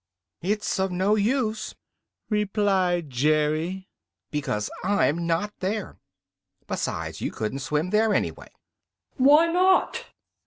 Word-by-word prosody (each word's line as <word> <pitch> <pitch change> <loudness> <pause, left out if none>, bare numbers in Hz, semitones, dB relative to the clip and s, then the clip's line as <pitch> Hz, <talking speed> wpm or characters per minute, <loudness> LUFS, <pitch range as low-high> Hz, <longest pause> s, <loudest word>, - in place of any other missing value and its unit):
"It's 205 +2 -1
of 190 0 0
no 190 +3 +1
use," 220 +1 0 0.5
replied 195 - +1
Jerry, 155 +7 0 0.4
"because 120 -8 -2
I'm 170 -4 +1
not 190 +5 0
there. 205 +2 -3 0.7
Besides, - - -4
you - - -1
couldn't 110 +5 -4
swim 150 +6 -1
there, 220 +1 +3
anyway." - - -2 0.7
"Why 290 +5 +6
not?" 365 +3 +2
190 Hz, 105 wpm, -25 LUFS, 160-215 Hz, 0.7 s, Why